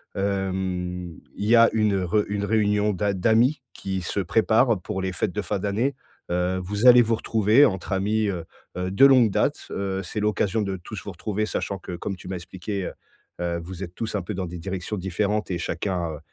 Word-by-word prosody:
hem, 95 -3 -2 0.2
il 100 - -4
y 115 +3 +5
a 115 0 +7
une 105 -3 +2
re 105 +4 +2
une 100 0 -1
réunion 105 -1 +2
d'a 100 +2 0
d'amis 115 +9 +3
qui 95 -1 -4
se 90 +4 -3
prépare 110 +4 +3
pour 95 0 -4
les 95 0 -1
fêtes 90 - -1
de 105 - -1
fin 105 0 -2
d'année. 110 +8 0 0.4
Heu, 90 +1 0
vous 105 +5 -2
allez 125 -1 +9
vous 115 -1 +2
retrouver 110 +5 +4
entre 95 -2 -2
amis, 105 +3 +1
heu 85 -4 -4 0.3
heu, 90 +1 -2
de 115 +8 +6
longue 125 -6 +6
date. - - 0
Heu, 95 0 -2
c'est 110 - -4
l'occasion 105 0 +1
de 100 -2 -2
tous 85 - -8
vous - - -6
retrouver 110 0 -2
sachant 100 -2 -3
que 90 - -7
comme 95 +3 -4
tu - - -12
m'as 95 - -3
expliqué 95 +2 -5
heu - - -5 0.5
heu, 85 -1 -1
vous 90 +2 -7
êtes 90 -1 -8
tous 110 -2 -4
un 100 - 0
peu 90 - -5
dans 95 0 -2
des 85 0 -7
directions 95 +3 -4
différentes 100 +3 -1
et 90 - 0
chacun, 85 0 -2
heu, - - -6
100 Hz, 215 wpm, -24 LUFS, 90-105 Hz, 0.5 s, allez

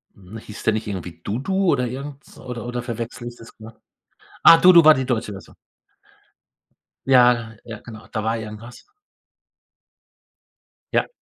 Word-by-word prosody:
Mhm. 100 +3 -12
Hieß 105 -1 -11
der 110 - +2
nicht 110 0 -4
irgendwie 90 -4 -6
Dudu 185 - -1
oder 125 -3 0
irgends 140 +3 -9
oder 125 -2 -7
oder 120 0 -4
verwechsle 120 0 -6
ich 120 - -8
das 115 - -14
na? 110 +1 -13 0.6
Ah, 165 - +9
Dudu 175 -2 +7
war 155 0 +8
die 130 -2 -3
Deutsche 115 -4 -2
Version. 95 - -12 1.5
Ja, 120 -3 +4
ja, 115 -1 -9
genau, 110 -2 -13
da 110 -1 -3
war 115 +1 -1
irgendwas. 110 +2 -10 2.1
Ja. - - +1
120 Hz, 145 wpm, -21 LUFS, 110-130 Hz, 2.1 s, Ah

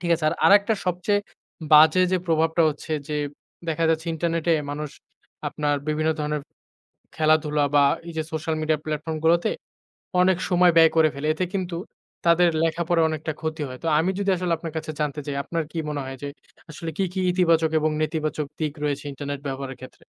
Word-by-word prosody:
ঠিক 170 -1 -2
আছে। 160 -1 -4
আর - - 0
আরেকটা 205 +2 +5
সবচেয়ে 180 +3 +1 0.5
বাজে 155 +4 +7
যে - - +4
প্রভাবটা 160 0 +2
হচ্ছে 155 +1 -5 0.2
যে 150 - -2 0.5
দেখা 165 +1 0
যাচ্ছে 160 0 -1
ইন্টারনেটে 165 +1 0 0.2
মানুষ 150 0 -4 0.6
আপনার 145 -1 -1
বিভিন্ন 155 +1 +1
ধরনের 150 -1 -2 0.7
খেলাধুলা 155 -1 +2
বা 145 - +6 0.2
এইযে 160 -1 -3
সোশ্যাল 160 0 -2
মিডিয়া 155 0 +1
প্ল্যাটফর্ম 155 +1 -3
গুলোতে 170 +1 +3 0.7
অনেক 185 -1 +4
সময় 180 -1 +5
ব্যয় 165 -1 +7
করে 160 -1 +5
ফেলে। 140 +2 -3
এতে 180 +4 -1
কিন্তু 180 -3 -2 0.5
তাদের 170 +1 +5
লেখাপড়ার 165 0 +2
অনেকটা 155 0 -3
ক্ষতি 160 0 -3
হয়। 130 0 -9
তো 165 - -2
আমি 170 - +1
যদি 200 -1 0
আসলে 180 -1 -1
আপনার 165 -1 -7
কাছে 155 0 -4
জানতে 150 0 -1
চাই 145 -2 -4
আপনার 165 -1 -2
কি - - -7
মনে 145 -1 -3
হয় 135 0 -7
যে - - -2 0.4
আসলে 160 +2 -6
কী, 195 - +1
কী, 190 - -2
ইতিবাচক 165 -3 +3
এবং 155 0 +1
নেতিবাচক 155 -1 -2
দিক 155 -2 -1
রয়েছে 145 -1 -1
ইন্টারনেট 140 0 -5
ব্যবহারের 135 -1 -5
ক্ষেত্রে? 130 - -12
160 Hz, 180 wpm, -24 LUFS, 150-170 Hz, 0.7 s, বাজে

